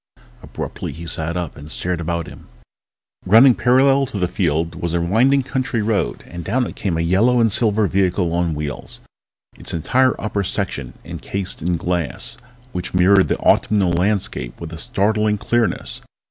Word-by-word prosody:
Abruptly -, -, -6 dB
he 85 Hz, +2 st, -9 dB
sat 80 Hz, +1 st, -2 dB
up 85 Hz, -4 st, -4 dB
and 75 Hz, +1 st, -11 dB
stared 90 Hz, +1 st, -2 dB
about 85 Hz, 0 st, -2 dB
him. -, -, -13 dB, 0.8 s
Running 115 Hz, +7 st, +7 dB
parallel 135 Hz, +3 st, +3 dB
to 115 Hz, -, -6 dB
the 90 Hz, -2 st, +1 dB
field 85 Hz, -2 st, -1 dB
was 85 Hz, 0 st, -3 dB
a -, -, +2 dB
winding 120 Hz, +11 st, +3 dB
country 125 Hz, -4 st, -2 dB
road 105 Hz, -, -1 dB
and 85 Hz, 0 st, -8 dB
down 125 Hz, +8 st, 0 dB
it -, -, -7 dB
came 90 Hz, -5 st, -2 dB
a -, -, 0 dB
yellow 105 Hz, +9 st, +3 dB
and 115 Hz, -2 st, +3 dB
silver 110 Hz, 0 st, +2 dB
vehicle 90 Hz, -2 st, +1 dB
on 85 Hz, -2 st, 0 dB
wheels, 75 Hz, -2 st, -6 dB, 0.6 s
its -, -, -4 dB
entire 130 Hz, -, +2 dB
upper 105 Hz, -2 st, -2 dB
section 70 Hz, -, -3 dB
encased 100 Hz, -2 st, -4 dB
in 85 Hz, +1 st, 0 dB
glass 85 Hz, -6 st, -2 dB, 0.4 s
which 90 Hz, -2 st, -5 dB
mirrored 95 Hz, +2 st, +5 dB
the -, -, 0 dB
autumnal 100 Hz, -4 st, +2 dB
landscape 90 Hz, -, -1 dB
with 85 Hz, -1 st, -7 dB
a 80 Hz, -, -7 dB
startling 105 Hz, +3 st, +1 dB
clearness. 115 Hz, -2 st, -1 dB
95 Hz, 165 wpm, -20 LUFS, 85-110 Hz, 0.8 s, Running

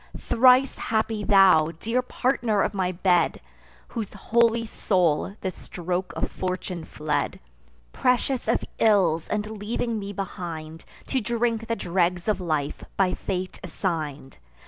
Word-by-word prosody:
Thrice 255 Hz, +2 st, +4 dB
happy 220 Hz, -1 st, -1 dB
thou, 185 Hz, -6 st, +5 dB
dear 230 Hz, +6 st, 0 dB
partner 245 Hz, -5 st, 0 dB
of -, -, -1 dB
my 185 Hz, -2 st, 0 dB
bed, 175 Hz, -1 st, +2 dB, 0.5 s
Whose 220 Hz, -4 st, -4 dB
holy 230 Hz, +3 st, +2 dB
soul 185 Hz, -4 st, +1 dB
the 190 Hz, -, -2 dB
stroke 180 Hz, +1 st, -4 dB
of -, -, -2 dB
Fortune 185 Hz, -2 st, -4 dB
fled, 150 Hz, -1 st, -2 dB, 0.5 s
Prescious 250 Hz, 0 st, +1 dB
of -, -, 0 dB
ills, 185 Hz, -7 st, +3 dB
and 210 Hz, 0 st, -3 dB
leaving 225 Hz, +1 st, -2 dB
me 200 Hz, 0 st, -5 dB
behind, 165 Hz, -5 st, -6 dB, 0.2 s
To 265 Hz, -, -1 dB
drink 230 Hz, 0 st, -1 dB
the 230 Hz, -, 0 dB
dregs 175 Hz, -1 st, 0 dB
of 210 Hz, -3 st, +1 dB
life 155 Hz, -4 st, -2 dB
by 190 Hz, -2 st, +3 dB
fate 185 Hz, -1 st, -4 dB
assign'd! 155 Hz, -7 st, -4 dB
195 Hz, 130 wpm, -25 LUFS, 175-225 Hz, 0.5 s, thou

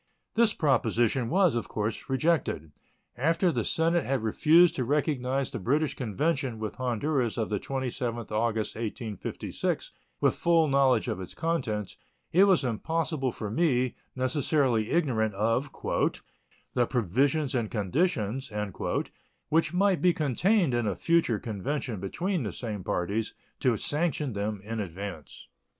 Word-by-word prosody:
This 230 Hz, -1 st, +3 dB
proposition 120 Hz, -3 st, +2 dB
was, 185 Hz, -3 st, +4 dB
of 120 Hz, -, -2 dB
course, 110 Hz, +4 st, -3 dB
rejected. 135 Hz, -, 0 dB, 0.4 s
After 165 Hz, +7 st, +2 dB
the -, -, -1 dB
Senate 165 Hz, +1 st, +2 dB
had 135 Hz, -3 st, -1 dB
refused 160 Hz, +10 st, +5 dB
to 130 Hz, -, +1 dB
recognize 135 Hz, -1 st, 0 dB
the -, -, -4 dB
British 145 Hz, +9 st, +1 dB
convention 130 Hz, -, -1 dB
with 110 Hz, -1 st, -5 dB
Honduras 130 Hz, 0 st, 0 dB
of 110 Hz, -, -1 dB
the 105 Hz, -, 0 dB
27th 120 Hz, -4 st, -3 dB
August, 110 Hz, 0 st, 0 dB
1856, 110 Hz, -2 st, -4 dB, 0.3 s
with -, -, +3 dB
full 165 Hz, -2 st, +3 dB
knowledge 135 Hz, -4 st, +3 dB
of 95 Hz, -, -2 dB
its 90 Hz, -, -9 dB
contents, 125 Hz, -, -2 dB, 0.3 s
it 190 Hz, +4 st, +6 dB
was 190 Hz, -6 st, +4 dB
impossible 135 Hz, +3 st, -1 dB
for 105 Hz, -2 st, -5 dB
me, 130 Hz, -3 st, +2 dB, 0.2 s
necessarily 130 Hz, -3 st, +1 dB
ignorant 115 Hz, -, +1 dB
of 115 Hz, +7 st, +1 dB, 1.0 s
"the 120 Hz, -2 st, +2 dB
provisions 130 Hz, -, +1 dB
and 115 Hz, -4 st, 0 dB
conditions" 120 Hz, -, -1 dB, 1.0 s
which 160 Hz, 0 st, +2 dB
might 190 Hz, 0 st, +2 dB
be 180 Hz, -1 st, +4 dB
contained 165 Hz, -, +2 dB
in 120 Hz, -2 st, +1 dB
a 100 Hz, -, 0 dB
future 165 Hz, -9 st, +2 dB
convention 115 Hz, +2 st, -3 dB
between 175 Hz, -, -2 dB
the 105 Hz, -, -3 dB
same 105 Hz, -5 st, -5 dB
parties, 100 Hz, +7 st, -2 dB, 0.2 s
to 125 Hz, -4 st, +2 dB
sanction 150 Hz, -, 0 dB
them 105 Hz, 0 st, -3 dB
in 110 Hz, +2 st, -4 dB
advance. 95 Hz, -4 st, -7 dB
130 Hz, 135 wpm, -28 LUFS, 110-155 Hz, 1.0 s, it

